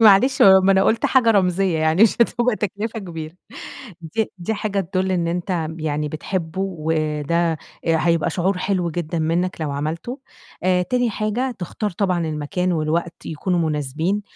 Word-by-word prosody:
معلش 225 +5 +6
م - - +9 0.2
ما 195 - +6
أنا 190 0 +4
قُلْت 225 - +2
حاجة 245 -4 +4
رمزية 185 -3 +2
يعني 160 +5 +3
مش 225 - +5
هتبقى 240 -1 +2
تكلفة 210 +3 -3
كبيرة 165 -4 -7 0.7
دي 205 +7 -2
دي 180 +5 -2
حاجة 205 -1 -2
تدُل 185 +1 -1
إن 175 -2 0
أنتَ 175 -1 -2
يعني 150 -1 -2
بتحبه، 165 +3 -3
وده 160 -2 0 0.3
هيبقى 165 0 +2
شعور 185 +3 0
حلو 180 -2 0
جدًا 170 0 -3
منّك 170 +2 -1
لو 150 -2 -2
عملته، 160 - -4 0.4
آآ 180 -1 +3
تاني 245 +6 0
حاجة، 215 +5 -1
تختار 205 +4 -3
طبعًا 180 -1 0
المكان 155 +4 -2
والوقت 165 +1 -2
يكونوا 175 +3 -1
مناسبين، 155 +7 -1
175 Hz, 155 wpm, -21 LUFS, 160-200 Hz, 0.7 s, م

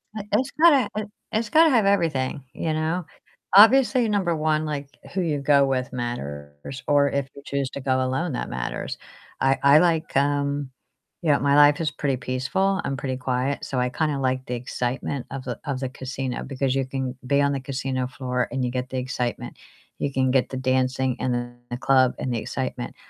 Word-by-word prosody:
I 210 - -4
it's 260 +6 +1
gotta 305 -5 +5 0.4
it's 220 0 -1
gotta 320 0 +6
have 230 -7 +3
everything, 155 -9 +1
you 160 -1 -2
know, 160 +2 -1 0.5
obviously, 245 +2 +7
number 185 -5 +1
1, 155 0 +1
like, 145 -2 -4 0.3
who 190 - 0
you 150 -4 0
go 140 0 +4
with 130 0 -1
matters, 75 - -6
or 145 -1 +4
if 140 -1 -1
you 140 - -10
choose 140 -2 -2
to 140 - -6
go 130 -1 +1
alone, 135 +4 -1
that - - -3
matters. 65 0 -4 0.4
I 135 0 +3
I 140 +2 +7
like, 165 -3 +1
um 140 -1 0 0.5
yeah 155 -4 +3
you - - +3
know, - - -4
my 140 0 +3
life 145 +2 +6
is 155 - 0
pretty 140 -3 -1
peaceful. 135 +11 0
I'm 135 - -1
pretty 130 0 -3
quiet, 130 +2 -1
so 130 - -2
I 125 - +1
kinda 150 +1 -1
like 130 0 -1
the 125 - -3
excitement 125 +2 -3
of 135 -1 -5
the 125 -3 -5
of 135 -3 -2
the 130 - -3
casino 130 -1 -4
because 135 -1 -1
you 135 -1 +1
can 130 -1 -4
be 140 +1 +3
on 140 0 +2
the 140 - -2
casino 130 -1 -3
floor, 125 -1 -2
and 130 -2 -1
you 120 - -2
get 125 0 -3
the 130 - -4
excitement. 125 -1 -3 0.4
You 140 - -1
can 130 -1 +2
get 130 -1 +2
the 130 - -5
dancing, 130 0 0
and 125 - 0 0.4
the 120 - -4
club, 130 -1 +3
and 125 - -2
the - - 0
excitement. 130 +1 -4
135 Hz, 200 wpm, -24 LUFS, 130-150 Hz, 0.5 s, obviously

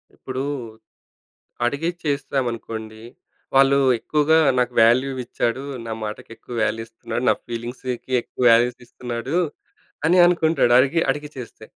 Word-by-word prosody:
ఇప్పుడు 130 0 -5 1.2
అడిగి 145 +7 -1
చేస్తామనుకోండి 120 -6 -3 0.5
వాళ్ళు 135 +1 +5 0.2
ఎక్కువగా 150 +5 +2 0.2
"నాకు 125 0 0
వాల్యూయిచ్చాడు, 125 +1 +1 0.2
నా 115 - -5
మాటకి 105 0 -6
ఎక్కువ 120 - -10
వాల్యూ 115 - -1
ఇస్తున్నాడు, 115 +1 -5
నా - - +5
ఫీలింగ్స్‌కి 120 +2 -6
ఎక్కువ 125 - -6
వాల్యూసీ‌స్తున్నాడు" 120 +2 -1 0.7
అని 175 +3 +4
అనుకుంటాడు. 165 -7 +3
అడిగి, 140 +6 +2
అడిగి 150 0 -6
చేస్తే, 125 -3 -9
125 Hz, 105 wpm, -22 LUFS, 115-140 Hz, 1.2 s, వాళ్ళు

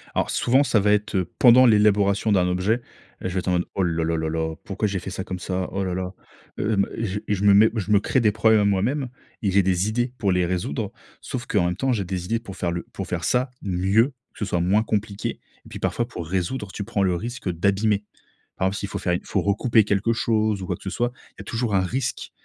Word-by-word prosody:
Alors, - - +1
souvent, 130 +4 +3
ça 115 -6 +2
va 105 +1 +3
êtes, 105 +1 -1
heu, 90 -2 0
pendant 125 +1 +8
l'élaboration 105 -1 +3
d'un 90 -3 +3
objet, 95 +7 +1 0.4
je - - -2
vais 95 +1 -1
être 90 - -6
en - - +2
mode: 90 0 +1
«Oh 100 - 0
là, 85 -2 0
là, 80 +1 0
là, 80 0 -1
là, 80 0 -2
pourquoi 105 +2 -2
j'ai 100 -2 -2
fait 95 - -7
ça 95 0 -4
comme 95 -1 -5
ça? 90 +1 -2
Oh 100 0 -2
là 90 -1 -2
là! 90 0 -3 0.5
hem, 105 -2 +1
et - - -3
je 100 0 -2
et - - +1
je 100 0 -2
me 100 -1 +6
mets 110 +2 +7
je 105 -1 -2
me 105 - +6
crée 130 - +1
des 110 -3 +3
problèmes 110 +1 +4
à - - +2
moi-même.» 120 +8 0 0.3
et 100 - +1
j'ai 100 +1 +4
des 95 +2 +1
idées 120 +3 -1
pour 100 -3 +1
les 90 -1 +2
résoudre. 85 -5 -2 0.3
Sauf 120 -2 -5
qu'en 100 -5 +2
même 90 0 0
temps, 130 +7 0
j'ai 105 -4 -1
des 90 -1 -4
idées 115 +5 0
pour 100 -5 -10
faire 85 - -1
le 85 0 -3
pour - - -5
faire 85 -1 -3
ça 125 - +1
mieux, 95 +6 +2 0.2
que - - -16
ce 105 - -1
soit 90 -3 0
moins 100 +5 +3
compliqué. 105 -2 -3 0.3
Et - - -13
puis, - - -8
parfois, 120 - -1
pour 85 -9 -7
résoudre, 95 +4 -2
tu 100 - -5
prends 105 -1 -2
le 90 -2 +2
risque 115 +2 -4
d'abîmer. 100 +4 +1 0.5
Par 95 - +1
exemple, 95 +1 -2
s'il 100 - -4
faut - - -4
faire 90 - 0
il - - -3
faut - - 0
recouper 110 +3 +3
quelque 105 +3 +1
chose 110 -3 0
ou 95 - -5
quoi 90 - -1
que - - -16
ce 95 - -3
soit, 120 +3 -1 0.2
il - - -43
y - - -5
a - - -11
toujours 115 -2 -2
un 95 - +4
risque. 120 +6 -3
100 Hz, 265 wpm, -24 LUFS, 90-110 Hz, 0.5 s, pendant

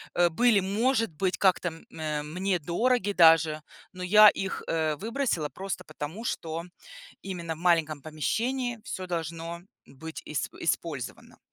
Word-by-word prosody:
э, 175 0 +4
были, 215 +5 +4
может 225 +4 +1
быть, 180 +2 -1
как-то, 185 -2 +3
м, 165 0 -13
а, 150 -1 -2
мне 180 +4 -1
дороги 205 - +1
даже, 160 -3 +5 0.3
но 185 - -9
я 210 +3 +8
их, 195 -1 -4
э, 160 -2 0
выбросила 225 - -1
просто 190 +7 -5
потому, 155 +7 -7
что 165 -5 -3 0.6
именно 170 -4 -5
в - - -14
маленьком 160 -4 +2
помещении 235 - -2
всё 185 - -5
должно 165 0 -4 0.2
быть 160 +4 -9
исп 150 -5 -4
использовано. - - -3
175 Hz, 140 wpm, -28 LUFS, 160-200 Hz, 0.6 s, я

